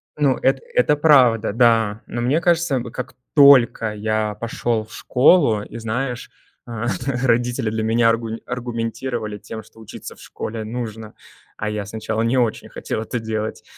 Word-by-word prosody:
Ну, 145 -3 +2
эт 135 0 +2
это 135 +4 +3
правда, 130 -8 +4
да. 115 -2 +3
Но 120 - -4
мне 130 +7 +2
кажется, 170 -4 +2
м, 125 - -1
как 130 +1 -7 0.2
только 130 -6 +6
я 110 0 -1
пошёл 115 +1 -2
в - - -16
школу 125 - +3
и, - - -9
знаешь, 120 +2 -4 0.4
э, 115 -1 -4 0.4
родители 120 0 +1
для 110 0 -2
меня 115 +1 +3
аргу 115 0 -1 0.2
аргументировали 115 -2 -4
тем, 110 +1 -8
что 110 - -20
учиться 110 - -10
в - - -21
школе 110 0 -6
нужно, 110 -1 -6 0.4
а 105 - -3
я 105 -1 -3
сначала 110 +1 -3
не 115 +3 +1
очень 120 -3 0
хотел - - -4
это 120 +2 -4
делать. 110 -1 -4
115 Hz, 160 wpm, -21 LUFS, 110-125 Hz, 0.4 s, только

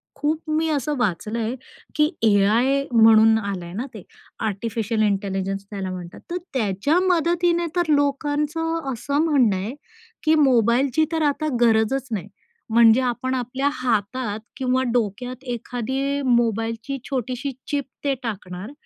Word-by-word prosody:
खूप 310 +3 -2
मी 315 +1 +1
असं 295 -1 -1
वाचलंय 225 +2 -1 0.4
की 300 0 +3
एआय 225 +6 +3
म्हणून 220 -1 +6
आलंय 190 -5 -4
ना 230 +7 -3
ते. 215 -5 -9 0.4
आर्टिफिशियल 220 +1 -2
इंटेलिजन्स 195 -1 -1
त्याला 195 -2 -4
म्हणतात. 180 -2 -8
तर 355 - -1 0.2
त्याच्या 235 - +1
मदतीने 345 0 +2
तर 345 -3 +1
लोकांचं 295 +2 0
असं 280 +5 -1
म्हणणं 265 -11 +3
आहे, 195 +6 -3 0.5
की 315 +1 +4
मोबाईलची 260 +3 +3
तर 325 -1 0
आता 310 +2 -2
गरजच 235 +3 +2
नाही. 210 -5 -3 0.4
म्हणजे 230 +2 +6
आपण 255 +1 -1
आपल्या 260 +3 -1
हातात 235 -3 -1 0.2
किंवा 260 0 +1
डोक्यात 245 +3 -2
एखादी 265 +4 -2
मोबाईलची 230 +1 0
छोटीशी 260 +1 -2 0.2
चिप 285 -2 -1 0.2
ते 280 -1 +1
टाकणार 190 -2 -6
245 Hz, 125 wpm, -23 LUFS, 215-285 Hz, 0.5 s, म्हणून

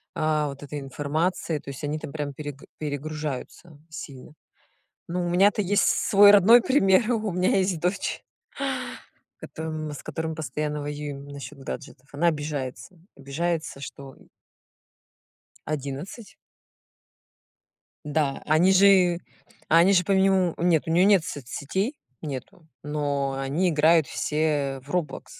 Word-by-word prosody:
а, 155 -1 +1
вот 140 0 -9
этой 145 +1 -6
информацией, 150 +4 -2
то 140 - -11
есть 140 +2 -8
они 150 +2 -2
там 145 - -8
прям 145 -2 -4
пере 145 0 -7 0.2
перегружаются 150 +1 -5
сильно. 140 -3 -9 0.7
Но 175 +1 -2
у - - -1
меня-то 195 +4 +4
есть 200 +2 +2
свой 205 0 +5
родной 210 +4 +7
пример, 230 -3 +3
у 220 -3 -1
меня 180 +2 +2
есть 185 -3 +1
дочь, 180 +4 -2 1.2
кото 155 -1 -5
с 145 - -9
которой 160 0 -4
мы 160 - -5
постоянно 150 -1 -3
воюем 145 -1 -6
насчёт 140 +1 -9
гаджетов. 135 0 -8
Она 160 +5 +1
обижается, 150 +2 -5 0.2
обижается, 155 +2 -3
что, 135 0 -9
м - - -22 1.4
11. 150 - -6 1.7
Да, 150 -2 -1
они 160 +5 +4
же 185 -3 +5 0.5
они 170 +5 +6
же 180 -2 +4
по - - -1
минимуму 190 -2 +3
нет, 170 -3 +3
у - - 0
неё 175 +3 +4
нет 200 -4 +5
соцсетей, 145 - -3 0.3
нету, 155 +4 -7 0.2
но 145 -2 -1
они 140 +7 0
играют 160 0 +4
все 150 -3 -1
в 140 - -17
Roblox, 150 -6 -2
155 Hz, 130 wpm, -25 LUFS, 145-180 Hz, 1.7 s, родной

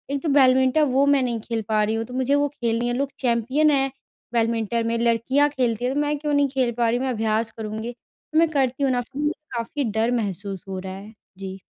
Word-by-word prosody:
एक 280 - -3
तो 315 - 0
बैडमिंटन 260 +1 +4
वो 275 +1 +5
मैं 285 -2 +4
नहीं 235 -2 -1
खेल 230 0 -3
पा 215 -1 +3
रही 220 +1 0
हूँ 225 0 -2
तो 250 - -11
मुझे 260 +2 +1
वो 290 0 +2
खेलनी 235 -3 -1
है 240 - 0
लोग 275 0 -1
चैंपियन 260 +5 +2
हैं 270 -1 +1 0.4
बैडमिंटन 230 0 0
में 230 0 0
लड़कियाँ 240 +5 +2
खेलती 245 -4 -1
हैं 260 - 0
तो 290 - 0
मैं 295 0 0
क्यों 295 0 -2
नहीं 285 0 +3
खेल 255 -3 +1
पा 235 -1 +2
रही 240 - +1
हूँ? 260 - -2
मैं 255 - 0
अभ्यास 220 0 0
करूँगी 220 +2 -4
तो 310 +6 -5
मैं 330 -1 +4
करती 270 -2 0
हूँ 270 - +3
न 245 -1 0
मुझे 295 +1 +1 0.3
काफ़ी 270 +5 -2
डर 220 +3 +1
महसूस 200 -4 -3
हो 190 -1 -4
रहा 190 0 -6
है। 200 +3 -10 0.2
जी। 190 0 -7
240 Hz, 240 wpm, -23 LUFS, 225-275 Hz, 0.4 s, वो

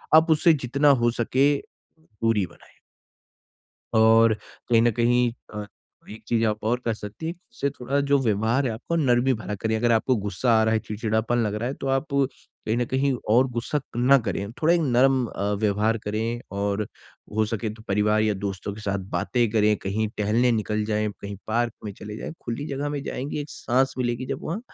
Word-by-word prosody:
आप 160 +1 +6
उससे 160 +2 +5
जितना 140 +1 +2
हो 120 - +4
सके 135 +5 +2 0.4
दूरी 115 - -1
बनाएँ। 85 - -18 1.2
और 110 0 +6 0.3
कहीं 115 -1 +5
न 120 - +4
कहीं 120 +1 +2 0.2
अ, 105 -1 -5 0.4
एक 110 +1 -10
चीज़ 115 -1 +2
आप 105 0 0
और 120 +3 +1
कर 115 -2 0
सकती 105 +9 -8
हैं, 165 - -1 0.2
उससे 140 - -1
थोड़ा 135 +1 -2
जो 140 0 +3
व्यवहार 115 +4 +1
है - - 0
आपको 150 +9 -3
नर्मी 130 -3 +3
भरा 105 -1 -5
करें, 110 +2 -1
अगर 120 +1 +2
आपको 115 +3 +2
गुस्सा 105 +4 0
आ - - +4
रहा 110 0 +2
है, - - +3
चिड़चिड़ापन 110 +2 -1
लग 105 -3 0
रहा 115 +4 -2
है 135 - -3
तो - - -4
आप 135 - -3
कहीं 135 -4 -2
न 120 - +1
कहीं 135 +2 +1 0.2
और 130 +2 +5
गुस्सा 120 +5 -2
क 140 - -9
ना 130 +3 +5
करें। 100 -2 -3
थोड़ा 165 +2 +5
एक 170 - +2
नर्म 130 -2 +3
अ, 100 -1 -2
व्यवहार 110 +2 +1
करें 110 +3 -2 0.2
और 100 +1 -1 0.5
हो 110 - +3
सके 110 -1 -3
तो 110 - -14
परिवार 105 +2 +2
या 105 -1 +2
दोस्तों 100 0 -4
के 105 - -10
साथ 100 -1 -1
बातें 120 +6 +1
करें, 105 -1 +3
कहीं 105 +3 -1
टहलने 115 +4 +2
निकल 105 -1 -1
जाएँ, 105 0 0
कहीं 100 0 -6
पार्क 115 +1 0
में 105 - -4
चले 105 +2 -8
जाएँ, - - -6
खुली 120 +5 -4
जगह 140 +1 -2
में 145 -1 -3
जाएँगी 140 +2 -4
एक 145 0 -7
साँस 130 +2 0
मिलेगी 120 0 -1
जब - - -4
वहाँ 175 +8 -3
115 Hz, 200 wpm, -25 LUFS, 105-130 Hz, 1.2 s, आप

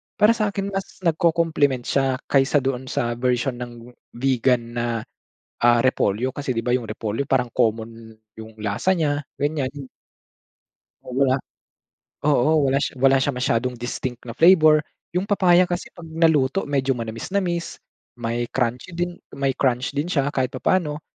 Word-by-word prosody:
Para 210 +2 +5
sa 225 -2 0
akin, 200 0 -3
mas 195 -1 -6
nagko-compliment 160 -6 +2
siya. 135 +1 +1
Kaysa 140 0 +2
doon 130 -1 -2
sa 120 -1 -2
version 125 +1 0
ng 120 0 -9 0.3
Vigan 130 -1 +2
na, 120 0 -1 0.8
ah, 120 0 +5
repolyo. 125 -1 +1
Kasi, 140 -2 -3
'di 115 - -1
ba 125 0 +2
yung 125 -2 -2
repolyo, 110 +4 -3
parang 125 -2 +1
common 115 -1 -1 0.2
yung 110 0 -10
lasa 105 - +1
niya, 150 -4 0 0.2
ganyan. 140 -2 -2 1.2
Oo, 125 - -7
wala 130 -1 +3 0.9
oo, 145 -1 +3 0.2
wala 135 +1 +2
sh - - -2
wala 135 +1 +4
siya 140 +2 0
masyadong 125 0 0
distinct 120 0 -5
na 115 -2 -8
flavor. 160 -3 +6 0.3
Yung 180 +3 -1
papaya 180 -3 +4
kasi 175 0 -4
'pag 170 -2 -12
naluto, 160 -1 +2
medyo 135 -2 0
manamis-namis. 170 - -3 0.3
May 120 0 -2
crunchy 125 +6 -2
din, 175 +1 -2 0.2
may 135 -1 -1
crunch 130 -1 +1
din 145 +3 0
siya, 145 -6 0
kahit 130 -2 -1
papano. 150 +2 0
135 Hz, 150 wpm, -23 LUFS, 120-160 Hz, 1.2 s, flavor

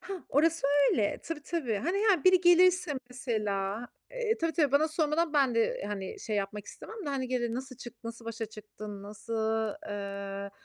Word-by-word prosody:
Hah, 380 -2 -6
orası 325 +1 +3 0.2
öyle. 210 -4 +1
Tabii, 325 -3 -5
tabii, 285 -10 -1
hani, 345 - 0
he, 405 -8 +3
biri 370 -1 +7
gelirse 360 -1 +5 0.2
mesela, 215 -3 -2 0.2
eee, 480 -3 -1
tabii, 330 -1 0
tabii 300 -5 +2
bana 300 +3 +4
sormadan 315 0 +1
ben 275 -5 +3
de, 230 - +4
eee, 225 - 0
hani, 195 -2 -5
şey, 215 -2 -2
yapmak 205 +1 -3
istemem 445 -3 -9
de - - -1
hani 265 -2 -2
gelir, 240 -2 0
"Nasıl 255 +1 -6
çık 240 -1 -11
nasıl 230 0 -7
başa 230 -1 -4
çıktın? 210 -1 -9
Nasıl, 220 +3 -2
eee, 200 0 -5
245 Hz, 180 wpm, -30 LUFS, 210-325 Hz, 0.2 s, biri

